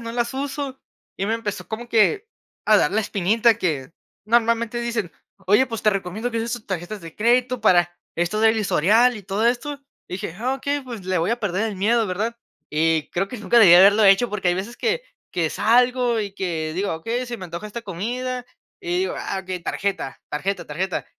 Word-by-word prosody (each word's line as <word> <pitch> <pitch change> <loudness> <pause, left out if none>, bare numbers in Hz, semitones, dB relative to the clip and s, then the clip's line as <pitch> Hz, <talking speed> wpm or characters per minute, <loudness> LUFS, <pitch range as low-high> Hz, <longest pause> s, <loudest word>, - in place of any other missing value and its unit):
no 230 0 -6
las 240 0 -1
uso", 275 0 -4 0.4
y 195 - -1
me 220 - 0
empezó 210 -3 -4
como 230 +2 -5
que, 315 - +3 0.4
a 215 - +6
dar 150 - +2
la 215 +3 +1
espinita 215 +4 +2
que 150 -5 -2 0.3
normalmente, 230 +1 +1
dicen: 230 -7 -2 0.3
"Oye, 210 +7 +5
pues 225 -3 -5
te 215 - +4
recomiendo 195 +4 -3
que 230 - -2
uses 230 +1 -2
tus 240 -3 -6
tarjetas 190 +2 -5
de 165 -1 -10
crédito 245 +2 +2
para 175 -4 +3 0.2
esto 175 +5 0
del 225 0 +4
historial 220 +6 +3
y 205 - -11
todo 200 +4 -2
esto", 280 +4 -1 0.3
dije: 180 -2 -5
"Ah, 255 +4 0
okey 285 +2 -2
pues, 240 -7 -8
le 185 0 0
voy 165 +5 0
a 235 - 0
perder 205 +2 -1
el 205 - -6
miedo", 220 +3 +2
¿verdad?, 215 +6 -2 0.3
y 160 0 +1
creo 195 +3 -1
que 250 - -7
nunca 215 +3 +2
debí 180 -6 +9
haberlo 200 +4 +7
hecho 195 +5 +5
porque 190 -3 -1
hay 175 - +3
veces 200 +6 -5
que 480 +2 0 0.3
que 165 -3 -1
salgo 245 +1 +3
y 205 -2 -3
que 160 -5 -3
digo: 190 -2 -1
"Okey, 235 +10 -3
se 240 -1 -5
me 185 - -8
antoja 170 +4 -6
esta 230 +3 -7
comida" 245 +6 -4 0.3
y 355 -1 -1
digo: 380 - -1
"Ah, 195 - -3
okey, 185 -1 -5
tarjeta, 195 -7 -3
tarjeta, 195 +7 -2
tarjeta". 180 +5 -3
215 Hz, 205 wpm, -22 LUFS, 185-240 Hz, 0.4 s, debí